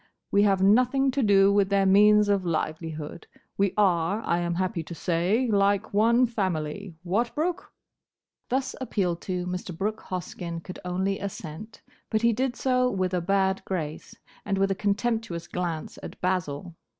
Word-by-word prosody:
We 200 - +4
have 195 -2 +3
nothing 255 +6 +4
to 275 +1 0
do 200 -3 +5
with 200 -1 +3
their 200 -1 +3
means 210 +2 +6
of 200 -2 +2
livelihood; 160 -1 -4 0.3
we 195 -1 +2
are, 195 +1 +2
I 170 - +1
am 170 0 -1
happy 180 -1 -1
to 170 +2 -8
say, 180 +10 +1
like 200 -1 +1
one 230 +4 +4
family. 190 -5 -3
What, 215 +7 -1
Brooke?" 345 +4 -2 0.8
Thus 265 +1 -1
appealed 180 -9 -1
to, 180 -2 -3
Mr. 180 -1 -5
Brooke 215 +3 -2
Hoskyn 175 -2 -5
could 185 - -8
only 190 +2 -1
assent: 200 +1 -7 0.3
but 220 +1 0
he 235 0 +4
did 250 +2 -1
so 255 -1 +2
with 185 -4 -1
a 180 - +1
bad 190 +1 +1
grace, 160 -5 -5 0.3
and 200 -1 -1
with 195 0 +2
a - - +3
contemptuous 205 -3 -1
glance 170 -3 -4
at - - -9
Basil. 180 -2 -2
195 Hz, 160 wpm, -26 LUFS, 175-215 Hz, 0.8 s, means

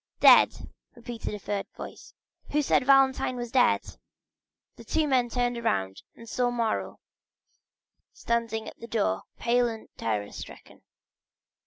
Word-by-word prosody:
"Dead!" - - +6 0.3
repeated 240 -1 -6
a - - -5
third 205 0 -4
voice. - - -10 0.3
"Who 295 0 +1
said 265 - +2
Valentine 270 -2 +4
was 240 -1 -5
dead?" 250 -1 +2 0.8
The - - -12
two 315 -1 0
men 255 -3 +2
turned 245 -1 -1
round, 95 - -1
and 230 - -13
saw 245 +2 0
Morrel 235 -2 -2 1.1
standing 230 -2 -2
at - - -10
the 230 - -9
door, 220 -3 0 0.2
pale 245 +1 +2
and 225 -1 -7
terror 105 -2 -2
stricken. - - -11
235 Hz, 135 wpm, -27 LUFS, 220-250 Hz, 1.1 s, Dead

